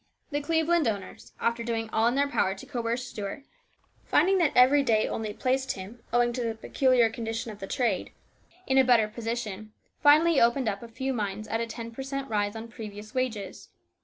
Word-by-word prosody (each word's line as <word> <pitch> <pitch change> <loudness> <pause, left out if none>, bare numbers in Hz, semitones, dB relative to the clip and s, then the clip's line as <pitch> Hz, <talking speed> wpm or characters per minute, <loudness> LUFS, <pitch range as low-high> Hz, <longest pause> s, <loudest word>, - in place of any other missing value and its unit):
The 290 0 -1
Cleveland 320 0 +2
owners, 200 -3 -5
after 235 0 0
doing 225 -1 -2
all 220 +1 +3
in 240 - +1
their 280 +1 +2
power 190 -8 0
to 195 - -11
coerce 240 -2 -2
Stuart, 210 +2 -6 0.6
finding 385 +1 +3
that 330 -5 +3
every 265 +3 +6
day 225 -5 +2
only 220 -1 -3
placed 260 +4 0
him, 200 +5 -9
owing 240 0 +2
to 250 - -3
the 225 -1 -2
peculiar 250 +1 +3
condition 225 0 -4
of 205 - -11
the 195 - -6
trade, 225 -6 -1 0.5
in 265 0 +3
a - - +7
better 240 -4 +4
position, 215 -2 -5 0.3
finally 310 +2 +6
opened 235 +2 +3
up 200 -2 -2
a 235 - -8
few 260 +3 -3
mines 210 -2 -3
at 225 +2 -1
a 230 - -2
ten 230 0 -7
per 230 - -7
cent, 275 0 -4
rise 205 0 0
on 225 +1 -6
previous 215 -2 -9
wages. 225 -7 -3
235 Hz, 195 wpm, -27 LUFS, 215-265 Hz, 0.6 s, a